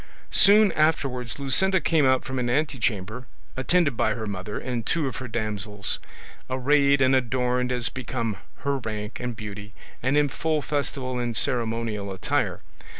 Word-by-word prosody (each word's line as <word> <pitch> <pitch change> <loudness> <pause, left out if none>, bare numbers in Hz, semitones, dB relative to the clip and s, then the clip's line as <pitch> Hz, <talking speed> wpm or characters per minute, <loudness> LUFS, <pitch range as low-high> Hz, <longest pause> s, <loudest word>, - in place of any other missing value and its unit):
Soon 205 +2 +6
afterwards 135 -6 0
Luscinda 190 +8 +3
came 160 -5 +3
out 130 -1 +2
from 130 0 -3
an 120 -1 -1
antechamber, 120 -5 -1 0.3
attended 140 +1 +2
by 110 -1 +1
her 110 -2 -4
mother 100 0 -4
and 125 -3 -3
two 165 +4 0
of 130 - -3
her 130 - -5
damsels, 105 -3 -3 0.5
arrayed 140 +2 +3
and 130 0 +4
adorned 125 0 +1
as 125 -2 +1
became 115 -4 -3 0.2
her 140 0 0
rank 105 -2 -5
and 125 -1 -3
beauty, 105 0 -8 0.3
and 130 +4 +2
in 150 0 +4
full 155 +2 -1
festival 135 -3 -2
and 120 -2 -1
ceremonial 115 -4 0
attire. 95 - -1
125 Hz, 150 wpm, -25 LUFS, 110-140 Hz, 0.5 s, Soon